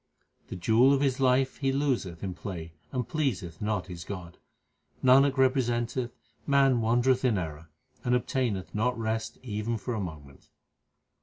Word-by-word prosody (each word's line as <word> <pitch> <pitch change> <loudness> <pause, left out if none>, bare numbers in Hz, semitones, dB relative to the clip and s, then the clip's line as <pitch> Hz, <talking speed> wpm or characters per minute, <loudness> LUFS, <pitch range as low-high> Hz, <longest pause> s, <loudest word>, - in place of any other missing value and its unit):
The - - -6
jewel 115 +9 +4
of 140 - +2
his 135 -2 +1
life 130 0 +2
he 135 -1 0
loseth 130 -12 -1
in 95 -2 -3
play, 85 -3 -7 0.2
and 125 -3 -2
pleaseth 125 - -2
not 105 -3 -1
his 85 -2 -8
God. 90 -3 -8 0.6
Nanak 135 +2 +5
representeth 125 -2 +1 0.3
man 135 -4 +4
wandereth 120 +3 +2
in 120 -5 +3
error, 80 -2 -5 0.3
and 125 0 +2
ob 125 - 0
taineth 105 -10 -2
not 120 +4 0
rest 110 0 -2
even 115 0 -2
for 120 +4 -4
a 110 - -2
moment. 75 -7 -8
120 Hz, 155 wpm, -28 LUFS, 95-130 Hz, 0.6 s, Nanak